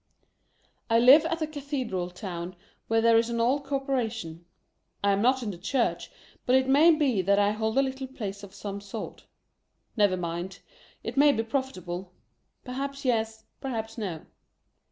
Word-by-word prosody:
I 230 - +4
live 270 +7 +7
at 330 -1 -1
a - - +2
cathedral 270 - -3
town 180 -1 -6 0.3
where 225 0 +2
there 230 0 +6
is 230 +1 0
an 235 0 -2
old 260 +5 +2
corpora 270 -4 0
tion. 170 -7 -8 0.6
I 200 - +4
am 200 0 +1
not 255 +2 +3
in 210 - -2
the 175 - -10
Church, 235 +6 -1 0.4
but 250 - +5
it 260 0 +3
may 290 +5 +6
be 285 - +3
that 200 +2 +3
I 205 0 +3
hold 220 +2 -1
a 275 - +5
little 265 0 -4
place 205 -6 -6
of 200 -2 -10
some 200 0 -6
sort. 205 +2 -8 0.7
Never 205 -4 +3
mind. 175 +2 -4 0.4
It - - -5
may 290 +1 +7
be 225 -5 0
profit 265 +1 -2
able. 180 +1 -6 0.5
Perhaps 275 +2 -5
yes, 225 -2 0 0.2
perhaps 225 -5 -4
no. 185 -8 -5
225 Hz, 175 wpm, -27 LUFS, 200-265 Hz, 0.7 s, live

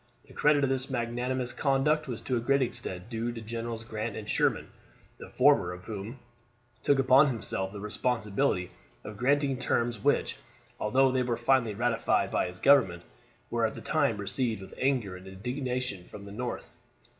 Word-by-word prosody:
The - - -16
credit 150 -1 +3
of 135 - +2
this 130 0 -1
magnanimous 125 +1 -2
conduct 150 +2 +1
was 120 -4 -5
to 130 - -1
a - - +1
great 140 +3 +2
extent 115 -7 -3
due 115 0 -3
to 120 - -7
Generals 115 0 -5
Grant 110 0 -4
and 105 - -7
Sherman, - - +1 0.5
the - - -10
former 90 - +4
of 90 +1 -10
whom 110 +3 -6 0.6
took 140 - +3
upon 135 +2 +6
himself 100 -6 -1
the 100 - -8
responsibility 105 -2 -1 0.3
of 105 - -8
granting 135 +3 +1
terms 120 -3 -1
which, - - +1 0.4
although 130 +5 +3
they 130 0 +1
were 120 -2 -1
finally 120 -3 +2
ratified 115 +1 +1
by - - +1
his 90 0 -9
government, 95 -10 +4 0.5
were 115 -1 0
at 110 - 0
the - - -8
time 145 -8 +1
received 110 +2 -1
with - - -12
anger 125 -8 0
and 90 +1 -13
indignation 125 +1 -3
in 100 -1 -9
the 100 - -9
North. 120 +4 -5
120 Hz, 175 wpm, -29 LUFS, 105-130 Hz, 0.6 s, upon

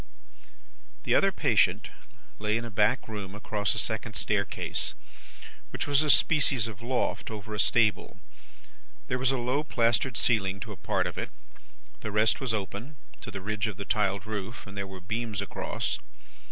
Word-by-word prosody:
"The - - +1
other - - +5
patient - - +2 0.5
lay 105 +1 +1
in 115 - -4
a 115 - -7
back 105 +5 +2
room 100 -3 -6
across 105 -1 -1
a - - -2
second 110 -1 -1
staircase, 100 +1 0 0.7
which - - -3
was 145 0 +4
a 155 - 0
species 135 -6 +4
of 110 -1 -8
loft 125 +2 -1
over 110 -1 -6
a 105 - -3
stable. 110 0 +2 0.9
There 125 - 0
was 130 0 +3
a 135 - +1
low 125 +5 0
plastered 120 -3 +2
ceiling 95 -5 +2
to 110 - -6
a - - -6
part - - 0
of - - -3
it; - - -3 0.7
the 110 - -4
rest 110 +4 +3
was 130 -3 0
open, 110 +7 -4 0.3
to 120 - -7
the 100 -2 -6
ridge 110 +3 -1
of 105 -3 -5
the 100 - -5
tiled 100 -3 +1
roof, 110 +2 -5
and 100 -1 -10
there 100 -1 -3
were 95 -1 -9
beams 110 +2 -3
across. 100 - -2
110 Hz, 175 wpm, -28 LUFS, 100-120 Hz, 0.9 s, other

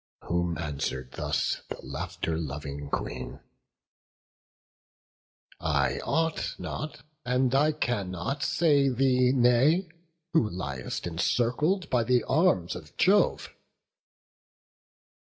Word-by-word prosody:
Whom 85 -1 -1
answer'd 70 -4 -3
thus 70 - -1
the - - -6
laughter 80 - -3
loving 70 -2 -5
Queen: 65 -2 -4 2.2
"I - - +1
ought 165 0 -1
not, 155 -4 -6 0.2
and 125 0 +1
I 150 +3 +4
cannot, 105 - -2
say 140 -1 +3
thee 125 0 +3
nay, 135 +8 +4 0.4
Who 120 -10 +3
liest 70 -10 -4
encircled 125 - +1
by 120 -2 +3
the 120 0 +2
arms 145 - +2
of - - -11
Jove." - - +3
120 Hz, 95 wpm, -28 LUFS, 85-140 Hz, 2.2 s, I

